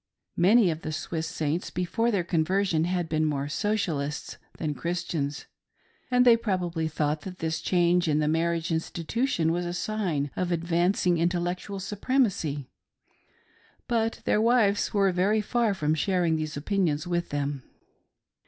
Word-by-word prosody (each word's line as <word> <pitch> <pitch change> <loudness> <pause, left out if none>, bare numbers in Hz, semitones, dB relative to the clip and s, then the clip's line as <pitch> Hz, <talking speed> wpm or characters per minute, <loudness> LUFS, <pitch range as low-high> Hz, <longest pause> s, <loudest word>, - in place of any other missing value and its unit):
Many 195 +2 +5
of 160 0 -5
the 155 - -4
Swiss 160 +1 -3
Saints 160 0 -2
before 225 +6 0
their 200 -6 +1
conversion 170 0 +1
had 175 -1 -1
been 155 0 0
more 145 -2 -1
Socialists 160 -5 -2 0.2
than 155 -2 -2
Christians, 155 -3 -3 0.6
and 250 0 +4
they 240 -2 +8
probably 180 -7 -1
thought 150 -1 -1
that 185 +1 -8
this 160 -1 -2
change 175 -1 +2
in 150 -1 +2
the 150 0 +1
marriage 165 +2 0
institution 165 - -1
was 175 +1 -1
a 175 - -3
sign 175 -8 -2
of 180 -1 -1
advancing 175 +1 +1
in 170 +1 +3
tellectual 180 +3 -3
supremacy; 195 - 0 1.2
but 225 -1 0
their 210 - +2
wives 225 -3 +3
were 195 -2 +3
very 195 +5 +2
far 220 0 +1
from 155 -3 0
shar 180 +3 +1
ing 160 -1 +2
these 155 -1 -3
opinions 160 -1 0
with 175 -1 -1
them. 145 -1 -2
175 Hz, 150 wpm, -27 LUFS, 155-195 Hz, 1.2 s, they